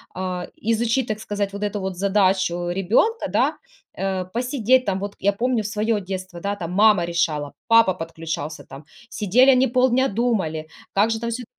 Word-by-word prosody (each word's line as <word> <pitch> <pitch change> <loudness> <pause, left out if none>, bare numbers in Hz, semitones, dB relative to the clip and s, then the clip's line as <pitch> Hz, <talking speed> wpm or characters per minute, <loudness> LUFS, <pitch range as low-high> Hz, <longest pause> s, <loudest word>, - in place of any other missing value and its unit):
а, 185 -1 -4 0.2
изучить, 235 +2 +1
так 215 -1 -3
сказать, 205 -2 -3
вот 200 +1 -5
эту 205 0 -2
вот 190 -2 -4
задачу 185 -3 +1
ребенка, 205 - +1
да, - - +2 0.4
э, 190 -1 -2
посидеть 250 +1 +2
там. 195 -1 -1
Вот, 200 +1 -5
я 200 - +2
помню 235 +2 0
в - - -3
своё 215 0 0
детство, 185 -1 -6
да, 200 +2 -2
там 175 -3 -5
мама 205 -2 +4
решала, 155 -4 -1
папа 230 -5 +5
подключался, 160 -2 -6
там, 135 +2 -11 0.3
сидели 230 +7 +4
они 260 0 +4
полдня 255 +1 +2
думали, 195 -9 -1 0.3
как 210 +3 +3
же 225 - -1
там 235 +1 -3
всю 240 +1 -4
200 Hz, 175 wpm, -22 LUFS, 185-230 Hz, 0.4 s, папа